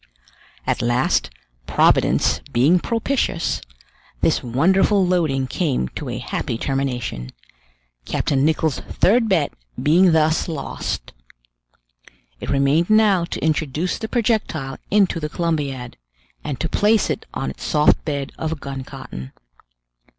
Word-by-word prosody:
At - - 0
last, 120 +2 +1 0.4
Providence - - +3
being 145 +10 +4
propitious, 230 -4 -1 0.6
this - - +2
wonderful 190 - +3
loading 160 -7 +1
came 130 - -1
to - - -6
a - - -3
happy 115 - -3
termination, 125 - -3 0.7
Captain 135 - 0
Nicholl's 155 -1 +1
third 225 +3 +2
bet 165 -7 +1 0.3
being 175 +4 +4
thus 160 0 +2
lost. 160 -4 -4 1.3
It - - -6
remained 140 +6 +2
now 210 -5 +4
to 170 - -4
introduce 155 +2 -1
the 220 - -4
projectile 215 - -1
into 195 -4 +3
the 150 -1 -3
Columbiad, 145 -7 -2 0.5
and 145 -4 -4
to 165 - -1
place 210 +5 +2
it - - -5
on 65 - -2
its - - -11
soft 150 -1 +3
bed 140 -3 -3
of 160 -1 -3
gun 135 -1 -6
cotton. 65 - -9
155 Hz, 120 wpm, -21 LUFS, 135-180 Hz, 1.3 s, being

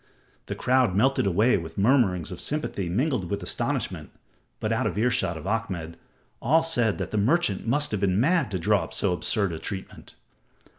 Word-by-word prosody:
The - - -4
crowd 125 -6 +2
melted 130 +1 +2
away 105 +7 +3
with 80 -2 -7
mutterings 100 - +2
of 90 - -7
sympathy 140 - -3
mingled 120 - 0
with 100 -2 -3
astonishment, - - -2 0.5
but - - -2
out - - +1
of - - -4
earshot 115 -7 +1
of 80 - -9
Ahmed, 95 -6 -3 0.5
all 160 +7 +3
said 120 -10 +1
the 110 - -3
merchant 115 - +1
must 145 +5 +1
have 105 - -1
been 95 0 +1
mad 165 +1 +2
to 95 - -2
draw 85 - +2
up - - -8
so - - +1
absurd 100 +2 0
a 80 - -5
testament. 95 +1 -7
105 Hz, 180 wpm, -26 LUFS, 90-130 Hz, 0.5 s, away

